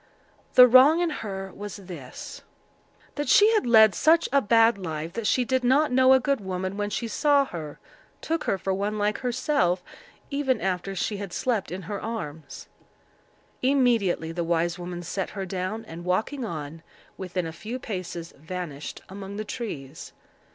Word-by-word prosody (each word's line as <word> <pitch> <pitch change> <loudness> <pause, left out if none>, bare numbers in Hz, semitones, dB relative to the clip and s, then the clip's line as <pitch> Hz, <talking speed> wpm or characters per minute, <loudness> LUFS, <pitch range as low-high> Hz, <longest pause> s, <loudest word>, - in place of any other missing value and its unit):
The 250 0 +10
wrong 260 +7 +7
in 350 -2 +1
her 195 -8 -5
was 205 0 -7
this—that 185 - -10
she 430 +6 +6
had 425 - +1
led 220 -3 +7
such 325 - +4
a 280 - +5
bad 225 -1 +4
life, 160 -2 -5
that 230 -2 -2
she 250 +2 +2
did 260 0 0
not 270 +4 +3
know 260 +1 +6
a 265 - +6
good 275 -2 0
woman 190 0 -3
when 205 0 -2
she 230 +3 -3
saw 285 +4 +3
her; 160 - -7 0.4
took 325 -1 -2
her 195 - +1
for 190 0 -2
one 205 +2 -2
like 210 0 0
herself, 245 - 0 0.5
even 275 -4 0
after 190 +1 -2
she 205 +3 -2
had 200 -2 -6
slept 225 -2 -1
in 185 +1 -5
her 200 +3 -5
arms. 160 -10 -6 0.9
Immediately 240 -11 +2
the 170 +1 -2
wise 170 +1 0
woman 175 0 -6
set 185 +2 -3
her 195 -2 -5
down, 190 +4 -4
and, 170 -3 -9
walking 215 +10 -1
on, 160 -5 -6 0.3
within 185 -2 -4
a 165 - -4
few 225 +8 -6
paces 180 -7 -6
vanished 160 -2 -7
among 195 +1 -8
the 215 - -4
trees. 160 - -7
200 Hz, 165 wpm, -26 LUFS, 175-250 Hz, 0.9 s, The